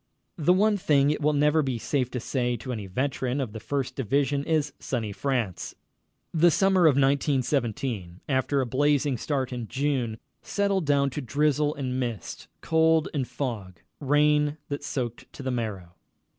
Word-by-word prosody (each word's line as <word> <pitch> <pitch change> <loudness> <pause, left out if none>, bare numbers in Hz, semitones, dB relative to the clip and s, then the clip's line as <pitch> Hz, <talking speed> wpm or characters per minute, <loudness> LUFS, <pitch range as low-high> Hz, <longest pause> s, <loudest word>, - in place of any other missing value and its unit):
The 155 +3 +3
one 205 +3 +4
thing 145 -5 +3
it 150 - -2
will 150 +1 +3
never 150 +2 +3
be 130 -4 -1
safe 125 +2 -1
to 125 - -4
say 125 0 -1
to 130 +3 -6
any 105 -4 -5
veteran 130 +5 -1
of 125 -6 -3
the 110 - -6
First 130 +2 -3
Division 140 +2 0
is 150 -3 0
"Sunny 115 -5 -3
France." 120 -4 -2 0.6
The 170 +1 +5
summer 190 -1 +4
of 145 - +4
1917, 130 - 0
after 135 0 +1
a - - 0
blazing 145 +2 +2
start 135 -4 -2
in 120 -2 -4
June, 130 -5 -1 0.2
settled 200 -5 0
down 140 -1 +3
to 145 - -4
drizzle 150 +3 +1
and 130 -2 -3
mist, 120 -5 -4
cold 160 -1 +3
and 135 -5 -1
fog, 105 -10 -5 0.2
rain 150 +1 +2
that 145 0 -4
soaked 120 -4 -4
to 140 - -9
the 130 - -1
marrow. 105 -8 -4
140 Hz, 165 wpm, -26 LUFS, 125-150 Hz, 0.6 s, The